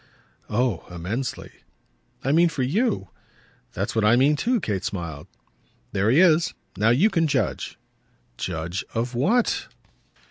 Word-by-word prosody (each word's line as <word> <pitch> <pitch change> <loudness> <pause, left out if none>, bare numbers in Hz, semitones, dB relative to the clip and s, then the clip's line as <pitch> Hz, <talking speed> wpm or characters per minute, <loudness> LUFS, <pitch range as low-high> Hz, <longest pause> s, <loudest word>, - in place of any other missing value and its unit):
"Oh 115 -4 0
immensely." 95 +9 -4 0.7
"I 135 - +1
mean 170 +3 +5
for 140 -5 -2
YOU." 180 - 0 0.6
"That's - - -2
what 110 - +2
I 105 +3 +5
mean 140 +4 +4
too," 240 - +1
Kate 100 - -2
smiled. 85 -7 -5 0.6
"There 100 +3 +1
he 130 +7 +5
is. 170 -1 +4 0.2
Now 105 +4 +2
you 160 - +4
can 165 -4 +2
judge." 145 - -1 0.6
"Judge 85 +4 -3
of 120 +2 -1
what?" 220 - +1
125 Hz, 135 wpm, -24 LUFS, 100-165 Hz, 0.7 s, mean